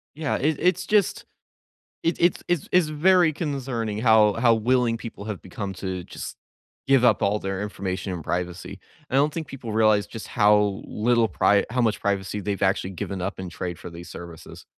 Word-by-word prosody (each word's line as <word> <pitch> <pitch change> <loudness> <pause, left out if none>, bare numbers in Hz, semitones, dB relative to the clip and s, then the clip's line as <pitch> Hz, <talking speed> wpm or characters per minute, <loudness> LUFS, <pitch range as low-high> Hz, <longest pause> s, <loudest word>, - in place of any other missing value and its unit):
Yeah, 150 -1 -1
it 150 +1 0
it's 180 +1 +1
just 210 -4 +1 0.8
it 165 - +1
it's 175 +1 +2
it's 175 -4 -1
it's 180 -3 +4
very 165 +1 +4
concerning 130 -9 -3
how 110 -3 +5
how 115 0 +4
willing 115 +1 +2
people 110 -3 -8
have 105 -3 -5
become 95 +1 -6
to 95 -1 -4
just - - -8 0.5
give 135 -2 +4
up 120 - +4
all 100 +2 +2
their 95 0 -3
information 95 -1 -4
and 85 -3 -6
privacy. 90 +3 -4 0.3
I - - -1
don't 145 +2 +3
think 160 -2 -4
people 120 -5 -7
realize 110 -2 +3
just 110 - -8
how 105 -1 +3
little 115 +1 +2
pri 100 0 +3
how 125 +2 0
much 110 -3 +1
privacy 100 0 -1
they've 100 0 -3
actually 95 0 +1
given 95 +1 -5
up 95 +1 -4
in 95 -1 -5
trade 90 0 -5
for - - -9
these 85 +1 -10
services. 85 -2 -10
105 Hz, 185 wpm, -24 LUFS, 95-135 Hz, 0.8 s, how